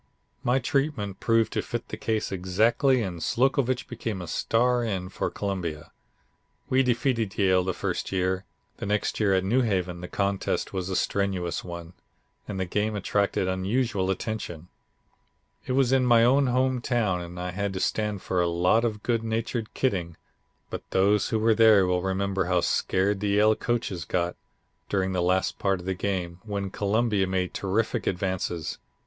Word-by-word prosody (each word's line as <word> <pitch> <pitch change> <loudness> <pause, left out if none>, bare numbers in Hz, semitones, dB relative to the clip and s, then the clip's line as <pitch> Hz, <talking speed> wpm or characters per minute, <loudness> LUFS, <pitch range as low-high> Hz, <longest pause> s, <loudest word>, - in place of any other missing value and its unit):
My 125 +2 +3
treatment 135 -7 -1
proved 115 -2 +2
to - - 0
fit - - -5
the - - -4
case 110 -1 -2
exactly 110 - +2
and 90 -4 -5
Slocovitch 130 - +1
became 115 -4 -4
a 90 - -5
star 120 +8 +1
end 95 -4 -3
for - - -1
Columbia. 90 -7 -4 0.8
We 130 +1 +5
defeated 120 -4 0
Yale 95 -2 +3
the 95 0 -2
first 90 -3 -3
year; 95 0 0 0.3
the - - -5
next 105 0 0
year 100 -3 +3
at 95 - +2
New 120 +7 +2
Haven 90 -6 -1
the 90 - -6
contest 100 0 -1
was 95 -1 -3
a 95 - -2
strenuous 95 -4 -1
one, 85 -1 -8 0.5
and 100 -2 -4
the 95 - 0
game 105 +4 -1
attracted 100 -1 0
unusual 95 +1 0
attention. 95 -4 -4 1.0
It 130 - 0
was 130 -1 +3
in 135 -1 +4
my 120 -1 +6
own 135 +3 +4
home 130 0 +1
town, 105 -8 0
and 85 +1 -8
I 90 0 -3
had 100 +2 -2
to 95 - -3
stand 105 -1 -1
for 90 -1 0
a 85 - +2
lot 90 +7 +3
of 110 -3 -2
good 115 -2 0
natured 115 0 -2
kidding, 90 -10 -1 0.5
but - - -4
those 100 +2 +3
who 110 - +1
were 110 +1 +3
there 110 -3 +6
will 90 0 +1
remember 95 0 0
how 90 -1 +2
scared 95 +3 +1
the 105 - -1
Yale 105 +2 +4
coaches 110 -8 -2
got 85 -1 -1 0.5
during 95 -1 0
the 90 -1 0
last 90 +1 +1
part 95 -2 +1
of 90 - -10
the 95 - 0
game, 90 -2 -3
when 100 -2 -3
Columbia 105 -1 +1
made 95 -1 -1
terrific 100 +3 -1
advances. 90 -3 -2
100 Hz, 175 wpm, -26 LUFS, 90-115 Hz, 1.0 s, my